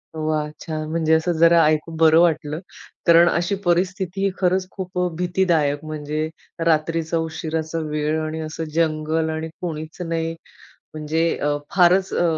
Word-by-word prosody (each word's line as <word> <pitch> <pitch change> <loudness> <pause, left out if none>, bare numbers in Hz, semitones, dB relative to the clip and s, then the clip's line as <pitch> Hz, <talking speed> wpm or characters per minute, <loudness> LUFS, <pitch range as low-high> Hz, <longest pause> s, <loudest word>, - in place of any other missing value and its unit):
वाह! 155 -1 -1 0.2
छान. 155 -1 -4
म्हणजे 160 -1 +1
असं 160 +2 +2
जरा 170 0 +6
ऐकून 155 +1 0
बरं 160 0 +6
वाटलं. 155 -2 +1 0.5
कारण 170 0 +7
अशी 175 +4 0
परिस्थिती 185 +2 0
खरंच 185 0 +1
खूप 185 -2 -7
अ, 180 - +2
भीतीदायक 170 -5 +1
म्हणजे 155 0 -3 0.4
रात्रीचा 165 +1 +1
उशिराचा 160 0 -3
वेळ 150 +1 -1
आणि 155 +1 -4
असं 160 +1 -5
जंगल 160 0 0
आणि 160 0 -3
कोणीच 160 0 -5
नाही. 165 -1 -2 0.6
म्हणजे 155 +2 -1
अ, 145 0 0 0.2
फारच 185 +1 +4
अ, 175 - +1
160 Hz, 140 wpm, -22 LUFS, 155-175 Hz, 0.6 s, कारण